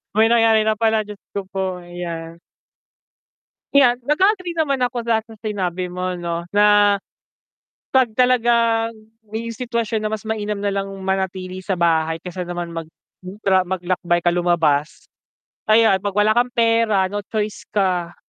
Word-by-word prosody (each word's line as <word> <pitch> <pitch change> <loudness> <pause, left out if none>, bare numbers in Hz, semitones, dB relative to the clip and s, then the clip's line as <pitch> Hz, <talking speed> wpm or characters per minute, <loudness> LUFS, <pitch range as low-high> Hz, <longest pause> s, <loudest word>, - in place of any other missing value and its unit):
May 220 +1 +5
nangyari 225 -2 +4
na 215 0 +1
pala, 220 -1 +2
Diyos 210 -1 -10 0.2
ko 200 - -2
po, 185 -2 -3
ayan. 170 -1 -7 1.3
'Yan, 255 -4 +5
nag-a-agree 365 - +1
naman 280 -5 0
ako 245 -1 -3
sa, 225 -1 +2
sa 225 0 -14
sinabi 185 -4 -2
mo 180 0 -3
'no 170 -1 -4
na, 205 0 +5 0.9
'pag 260 -3 +3
talagang 235 -2 +3 0.4
yung 230 +1 -4
sitwasyon 230 -2 -2
na 215 - -1
mas 215 -1 -3
mainam 210 -2 -2
nalang 200 -1 -2
manatili 190 -1 -2
sa 190 0 -1
bahay 165 -1 +1
kaysa 180 0 -5
naman 175 -1 -4
mag 165 -1 -5 0.4
hmm 185 +3 -9
tra 190 -1 +3
maglakbay 175 -1 -1
ka 175 - +3
lumabas. 165 -4 +1 0.6
Ayan, 220 -2 +5
'pag 205 -1 -3
wala 210 +1 +4
kang 240 +2 +2
pera, 230 -4 +3
no 205 +1 -3
choice 210 -1 -3
ka, 180 -4 0
205 Hz, 150 wpm, -20 LUFS, 180-225 Hz, 1.3 s, May